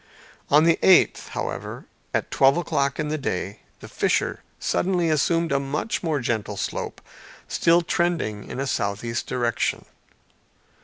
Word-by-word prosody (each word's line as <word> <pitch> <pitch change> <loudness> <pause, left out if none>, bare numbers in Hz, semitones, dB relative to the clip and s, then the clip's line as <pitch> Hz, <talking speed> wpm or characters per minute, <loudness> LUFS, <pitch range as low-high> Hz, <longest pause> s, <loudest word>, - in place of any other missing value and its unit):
On 150 +2 +6
the 165 0 +4
eighth, 190 - +5
however, - - -5 0.3
at - - -2
twelve 135 +2 +4
o'clock 140 -5 0
in 150 -1 -1
the 155 0 -2
day, 100 -5 -3 0.2
the - - -9
fissure - - 0 0.2
suddenly 175 -3 +1
assumed 165 +2 +1
a 140 - +3
much 140 +10 -2
more 160 -4 0
gentle 110 -4 -2
slope - - -4 0.5
still 170 +1 +3
trending 165 - -1
in - - -5
a 135 - -1
southeast 115 0 -2
direction. 120 -2 -1
140 Hz, 140 wpm, -24 LUFS, 120-170 Hz, 0.5 s, On